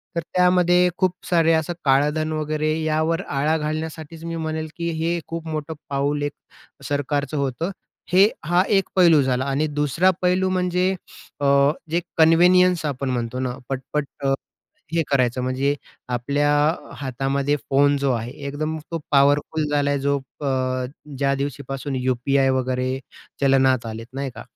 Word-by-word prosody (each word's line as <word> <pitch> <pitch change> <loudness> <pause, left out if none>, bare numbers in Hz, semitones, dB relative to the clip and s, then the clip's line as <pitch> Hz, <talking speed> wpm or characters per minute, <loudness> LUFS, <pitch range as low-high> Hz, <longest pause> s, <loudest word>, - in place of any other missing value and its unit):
तर 170 - 0
त्यामध्ये 180 0 +4
खूप 185 -1 +2 0.2
सारे 165 -2 +4
असं 160 +2 0
काळधन 150 +3 +2
वगैरे 155 0 -1
यावर 160 +3 +1
आळा 150 +3 +1
घालण्यासाठीच 155 +1 -5
मी 165 0 -4
म्हणेल, 160 -1 -3
की 170 0 -2
हे 170 +1 0
खूप 165 0 -5
मोठं 155 0 -4 0.2
पाऊल 145 +1 0
एक 145 - -2 0.6
सरकारचं 145 0 -1
होतं. 140 +7 -1 0.4
हे 190 +3 +7 0.2
हा 175 +2 +3
एक 195 - 0
पैलू 170 -5 +6
झाला 130 0 0
आणि 140 +3 0
दुसरा 150 +5 +2
पैलू 185 +1 +2
म्हणजे 180 0 +1 0.5
अ, - - +1 0.5
जे 170 +1 +1 0.2
कन्व्हिनियन्स 175 +1 +5
आपण 135 -2 -2
म्हणतो 125 0 -2
ना, 125 -1 -3
पट-पट 135 +2 -2 0.2
अ, 135 - +3 0.6
हे 165 - +2
करायचं 125 -2 +2
म्हणजे 135 +3 0 0.3
आपल्या 140 +4 +1 0.5
हातामध्ये 135 +2 0
फोन 145 +1 +4
जो 140 -1 +1
आहे 115 +1 -3 0.2
एकदम 155 +3 -3
तो 165 - -2
पॉवरफुल 145 +2 +3
झालाय. 145 -1 +1
जो 140 +1 +1
प 135 +2 -15
अ, 130 -1 0 0.3
ज्या 140 0 +2
दिवशीपासून 135 0 -4
UPI 135 +2 +2
वगैरे 130 +1 -1 0.4
चलनात 130 -3 +3
आलेत, 115 0 -6
नाही 135 0 -3
का? - - -8
145 Hz, 145 wpm, -22 LUFS, 135-165 Hz, 0.6 s, हे